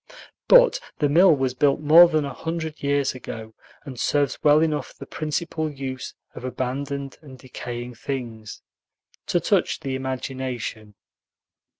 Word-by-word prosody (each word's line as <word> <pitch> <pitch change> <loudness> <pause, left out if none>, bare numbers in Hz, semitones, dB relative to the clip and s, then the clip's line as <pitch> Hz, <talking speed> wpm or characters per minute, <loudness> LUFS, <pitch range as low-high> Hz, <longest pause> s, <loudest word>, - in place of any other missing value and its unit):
But - - +6 0.2
the 150 - +2
mill 170 +3 +6
was 130 -2 -1
built 140 +2 +2
more 160 +4 +8
than 155 -3 +1
a 140 - -5
hundred 160 +1 -5
years 140 -1 +1
ago, 110 -3 -8 0.3
and 130 -4 -8
serves 145 -3 0
well 150 0 +6
enough 155 -3 -1
the - - -10
principal 155 0 -3
use 130 -2 -6 0.2
of - - -10
abandoned 135 +2 -4
and 135 -4 -13
decaying 125 -1 -7
things, 115 -3 -6 0.6
to - - +2
touch - - +1
the 135 - -3
imagination. 130 -5 -5
135 Hz, 135 wpm, -24 LUFS, 130-150 Hz, 0.6 s, more